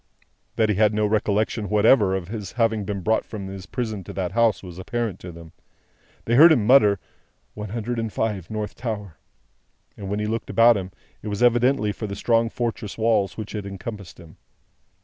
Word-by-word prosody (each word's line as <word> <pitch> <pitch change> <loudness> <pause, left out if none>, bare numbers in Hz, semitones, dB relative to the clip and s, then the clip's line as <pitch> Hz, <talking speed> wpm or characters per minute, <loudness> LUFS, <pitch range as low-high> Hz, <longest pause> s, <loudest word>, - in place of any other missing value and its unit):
That 110 -1 +2
he 105 - +2
had 105 0 +3
no 105 0 +1
recollection 105 0 0
whatever 105 -1 +4
of 90 -3 -4
his 105 -2 -6
having 115 -3 0
been 100 -1 -4
brought 110 +5 +1
from 105 -4 -7
his 95 -1 -8
prison 110 -6 -4
to - - -8
that 95 -2 -3
house, 115 -1 +2
was 90 -1 -9
apparent 115 -1 -3
to 90 - -9
them. 85 -1 -12 0.7
They 115 - 0
heard 160 +7 +8
him 120 -9 +3
mutter, 105 -6 +5 0.5
"One 105 -1 -7
Hundred 115 +2 -3
and 115 -1 -3
Five, 100 -6 -2
North 105 -1 -4
Tower;" 105 - -6 0.8
and 100 -2 -7
when 105 - -1
he 105 - -1
looked 115 +2 -3
about 115 +1 +5
him, 95 -2 -4 0.3
it 105 0 -4
evidently 120 -1 +3
was 105 - -5
for 110 - -4
the 100 - -5
strong 115 +1 +1
fortress 115 -3 -4
walls 110 -3 +1
which 110 -2 -6
had 105 -2 -4
long 100 - -6
encompassed 100 -2 -8
him. 85 -2 -15
105 Hz, 200 wpm, -23 LUFS, 100-115 Hz, 0.8 s, heard